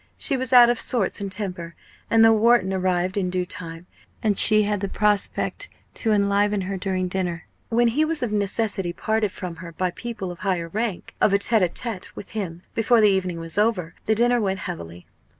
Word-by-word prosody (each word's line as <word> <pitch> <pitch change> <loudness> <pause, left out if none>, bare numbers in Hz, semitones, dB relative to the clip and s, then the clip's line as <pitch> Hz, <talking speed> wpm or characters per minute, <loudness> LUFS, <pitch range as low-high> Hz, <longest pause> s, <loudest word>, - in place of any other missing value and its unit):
She 280 - +3
was 260 -2 -3
out 240 -1 +8
of 240 - -2
sorts 215 -4 -1
and 200 -1 -4
temper, 180 -5 -4 0.3
and 225 0 +5
though 225 - +6
Wharton 220 -3 +3
arrived 185 0 -1
in 185 -2 0
due 180 0 -2
time, 170 -2 -8 0.4
and 210 -2 +2
she 215 +2 +7
had 205 -1 -1
the 200 0 -3
prospect 210 0 0 0.2
to 225 - -1
enliven 205 0 +1
her 190 +1 -4
during 185 -1 -2
dinner 180 -2 -3 0.2
when 235 +1 +3
he 285 +7 +1
was 310 -3 -1
of 235 - -2
necessity 200 -3 -1
parted 220 +1 -1
from 180 -4 -7
her 170 -1 -9
by 185 +2 -2
people 220 -4 -6
of 175 - -11
higher 180 -4 -2
rank 215 0 -4
of 200 - +3
a - - +5
tête 220 +2 +2
à 180 -2 +1
tête 225 -5 -3
with 200 - -9
him 180 -6 -6
before 230 +1 +3
the 210 -1 +5
evening 185 -3 -2
was 165 +4 -4
over, 195 -7 0
the 220 - +3
dinner 240 +1 +2
went 195 -2 -2
heavily. 85 - -7
200 Hz, 205 wpm, -23 LUFS, 180-220 Hz, 0.4 s, out